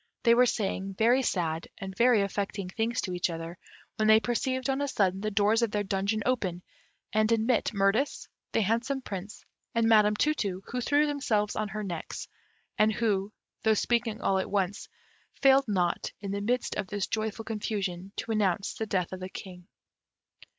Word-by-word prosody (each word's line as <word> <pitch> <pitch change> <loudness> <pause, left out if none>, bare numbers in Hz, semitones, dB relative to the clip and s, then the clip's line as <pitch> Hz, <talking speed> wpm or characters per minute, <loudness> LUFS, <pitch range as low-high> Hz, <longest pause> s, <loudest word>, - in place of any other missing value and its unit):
They 235 - +6
were 250 +1 +5
saying 195 -3 -2
very 240 +5 +4
sad 165 -8 -1
and 190 -1 -7
very 235 -2 +4
affecting 200 -1 -3
things 225 +5 -1
to 185 - -4
each 180 0 0
other, 165 +1 -6 0.4
when 215 - +2
they 220 0 +7
perceived 255 +3 -1
on 270 +1 0
a 285 - 0
sudden 195 -7 +1
the 215 - -1
doors 210 +2 +3
of 235 - +2
their 205 0 -1
dungeon 200 +2 -1
open 190 -9 -1 0.5
and 215 +1 +2
admit 230 +2 +2
Mirtis, 210 +6 +1 0.2
the - - +2
handsome 235 +6 0
Prince, 200 -1 -7 0.3
and 230 -1 +3
Madam 210 -2 +5
Tu 305 +8 +2
tu, 195 -8 -3
who 250 +1 -3
threw 290 +4 +3
themselves 235 -8 0
on 215 -1 -2
their 215 +2 -4
necks, 175 -5 -5 0.5
and 215 +1 +5
who, 205 -2 0 0.3
though 220 -1 +3
speaking 235 0 0
all 190 -1 +2
at 190 - -3
once, 195 -1 -1 0.5
failed 270 0 +5
not, 180 -4 0
in 200 -2 -5
the 200 0 -2
midst 245 +4 0
of 205 - -2
this 205 0 -2
joyful 220 0 -3
confusion, 200 -4 -3
to 230 - -4
announce 200 -3 +1
the 220 - -4
death 185 -4 -1
of 185 - -5
the 185 0 -6
King. 180 -2 -10
210 Hz, 185 wpm, -29 LUFS, 195-230 Hz, 0.5 s, they